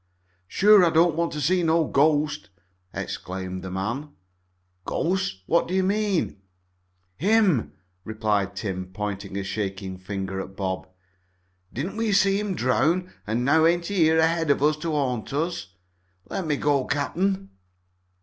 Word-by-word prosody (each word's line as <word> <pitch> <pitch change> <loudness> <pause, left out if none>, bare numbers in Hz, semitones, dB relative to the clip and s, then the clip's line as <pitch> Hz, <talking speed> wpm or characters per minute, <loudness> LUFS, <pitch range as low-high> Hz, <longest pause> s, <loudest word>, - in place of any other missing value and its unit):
"Sure 205 - +6
I 170 - +5
don't 165 +1 +4
want 170 +1 0
to 150 +3 +1
meet 180 -1 +2
no 165 0 +3
ghost!" 150 0 +1 0.4
exclaimed 95 0 -5
the 95 - -5
man. 110 +11 -3 0.7
"Ghost? 185 - -1
What 170 - +2
do 185 - -2
you 190 - +2
mean?" 200 - 0 0.8
"Him," 195 - +2 0.3
replied 105 -3 -1
Tim, 95 -2 -4
pointing 100 -1 -4
a 100 - -2
shaking 95 -1 -4
finger 95 0 -4
at 95 - -9
Bob. 95 -1 -3 0.8
"Didn't 170 - -4
we 225 -2 0
see 195 0 +3
him 205 -3 -2
drown, 150 +9 +1
an' 115 +3 0
now 160 +4 +5
ain't 170 +1 +1
he 200 +2 -3
here 160 -2 +4
ahead 165 0 +2
of 140 0 +2
us 150 +1 +4
to 165 +2 -4
haunt 130 -6 -1
us? 155 - -3 0.5
Let 185 - -4
me 150 - +1
go, 140 -2 +1
cap'n." 190 +7 -1
150 Hz, 150 wpm, -25 LUFS, -, 0.8 s, Sure